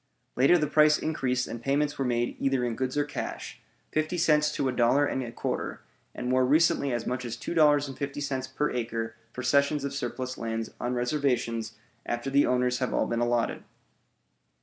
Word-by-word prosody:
Later 135 Hz, +8 st, +5 dB
the 155 Hz, -, +1 dB
price 150 Hz, +1 st, +5 dB
increased 130 Hz, -5 st, -1 dB
and 115 Hz, -, -6 dB
payments 145 Hz, +3 st, 0 dB
were 135 Hz, -, 0 dB
made 120 Hz, -1 st, 0 dB
either 135 Hz, -2 st, +1 dB
in 120 Hz, -2 st, -2 dB
goods 130 Hz, +2 st, -2 dB
or 145 Hz, -, +3 dB
cash; 145 Hz, -, -6 dB, 0.3 s
fifty 155 Hz, +3 st, -1 dB
cents 150 Hz, -2 st, +3 dB
to 135 Hz, -, 0 dB
a -, -, +1 dB
dollar 125 Hz, +4 st, +3 dB
and 130 Hz, -, -1 dB
a 120 Hz, -2 st, -5 dB
quarter, -, -, -3 dB, 0.3 s
and -, -, -4 dB
more 130 Hz, 0 st, +3 dB
recently 140 Hz, 0 st, +3 dB
as 120 Hz, -1 st, -2 dB
much 125 Hz, 0 st, -2 dB
as 115 Hz, -1 st, -5 dB
$2.50 140 Hz, -3 st, 0 dB
per 150 Hz, -, 0 dB
acre 115 Hz, -2 st, -3 dB, 0.2 s
for 125 Hz, -, -6 dB
cessions 140 Hz, +3 st, +2 dB
of 140 Hz, 0 st, -3 dB
surplus 130 Hz, -1 st, -4 dB
lands 115 Hz, -1 st, -3 dB
on 125 Hz, +1 st, -2 dB
reservations 120 Hz, -4 st, -1 dB, 0.3 s
after 120 Hz, +3 st, -3 dB
the 140 Hz, +1 st, +4 dB
owners 125 Hz, 0 st, +1 dB
have 130 Hz, -, -1 dB
all -, -, +2 dB
been 115 Hz, -, -1 dB
allotted. 120 Hz, 0 st, 0 dB
130 Hz, 180 wpm, -28 LUFS, 120-145 Hz, 0.3 s, Later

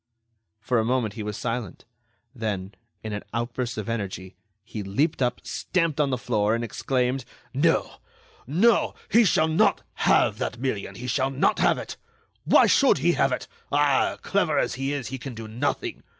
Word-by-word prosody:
For 120 Hz, +2 st, +1 dB
a -, -, +2 dB
moment 120 Hz, -3 st, 0 dB
he 110 Hz, -, -6 dB
was 105 Hz, -1 st, -4 dB
silent; 115 Hz, -5 st, -4 dB, 0.5 s
then, 105 Hz, -5 st, -3 dB, 0.3 s
in 110 Hz, -1 st, -4 dB
an 105 Hz, -, -3 dB
outburst 120 Hz, 0 st, -2 dB
of 110 Hz, -, -4 dB
energy, 95 Hz, -5 st, -4 dB, 0.3 s
he 110 Hz, -1 st, -6 dB
leaped 135 Hz, -, 0 dB
up, 125 Hz, -1 st, 0 dB
stamped 165 Hz, -5 st, 0 dB
on 145 Hz, -, +2 dB
the 130 Hz, -, 0 dB
floor, 110 Hz, -2 st, +1 dB
and 115 Hz, -, -2 dB
exclaimed: 125 Hz, +3 st, -1 dB, 0.3 s
"No, 160 Hz, +5 st, +1 dB, 0.5 s
no, 200 Hz, -, +3 dB, 0.2 s
he 235 Hz, +2 st, +6 dB
shall 160 Hz, -5 st, +3 dB
not 160 Hz, 0 st, +2 dB, 0.3 s
have -, -, +3 dB
that 120 Hz, -, -3 dB
million; 125 Hz, -5 st, -3 dB
he 120 Hz, -, -7 dB
shall 130 Hz, +1 st, +1 dB
not 135 Hz, +1 st, +1 dB
have -, -, +3 dB
it! -, -, -7 dB, 0.5 s
Why -, -, +6 dB
should 275 Hz, -, +4 dB
he 165 Hz, +5 st, +3 dB
have 135 Hz, -5 st, +2 dB
it? 125 Hz, -, -3 dB, 0.2 s
Ah! 145 Hz, -1 st, +2 dB
clever -, -, +1 dB
as -, -, +1 dB
he 135 Hz, +2 st, -2 dB
is, 140 Hz, -4 st, -3 dB
he 130 Hz, 0 st, -5 dB
can 130 Hz, 0 st, -7 dB
do 115 Hz, 0 st, -7 dB
nothing. 110 Hz, +3 st, -2 dB
125 Hz, 180 wpm, -25 LUFS, 110-140 Hz, 0.5 s, he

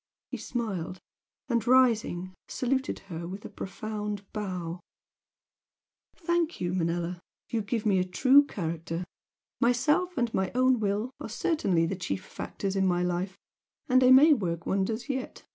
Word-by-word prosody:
He -, -, -3 dB
smiled, 190 Hz, -7 st, -4 dB, 0.5 s
and, 235 Hz, -2 st, 0 dB
rising, 225 Hz, -8 st, +3 dB
saluted 265 Hz, +2 st, -1 dB, 0.2 s
her 170 Hz, +1 st, -5 dB
with 195 Hz, +3 st, -7 dB
a -, -, -6 dB
profound 210 Hz, 0 st, -5 dB
bow. 180 Hz, -5 st, -4 dB, 1.4 s
"Thank 340 Hz, -1 st, 0 dB
you, 175 Hz, 0 st, -1 dB
Manella! 175 Hz, 0 st, -1 dB, 0.3 s
You 230 Hz, -, 0 dB
give 215 Hz, +2 st, -2 dB
me 195 Hz, -3 st, +3 dB
a -, -, +3 dB
true 255 Hz, +10 st, +5 dB
character! 165 Hz, -, -4 dB, 0.6 s
Myself 300 Hz, +9 st, +2 dB
and 240 Hz, -2 st, 0 dB
my 190 Hz, -, 0 dB
own 255 Hz, -1 st, +4 dB
will 210 Hz, +3 st, -1 dB
are -, -, -6 dB
certainly 210 Hz, -, +1 dB
the 190 Hz, -, -2 dB
chief 95 Hz, -, -4 dB
factors 195 Hz, -1 st, -4 dB
in 190 Hz, -1 st, +2 dB
my 175 Hz, -1 st, +2 dB
life 180 Hz, +2 st, -2 dB, 0.5 s
and 255 Hz, -2 st, +5 dB
they 255 Hz, -, +6 dB
may 290 Hz, +4 st, +8 dB
work 170 Hz, -, -2 dB
wonders 220 Hz, +5 st, -1 dB
yet! 265 Hz, -2 st, -4 dB
205 Hz, 145 wpm, -28 LUFS, 180-255 Hz, 1.4 s, may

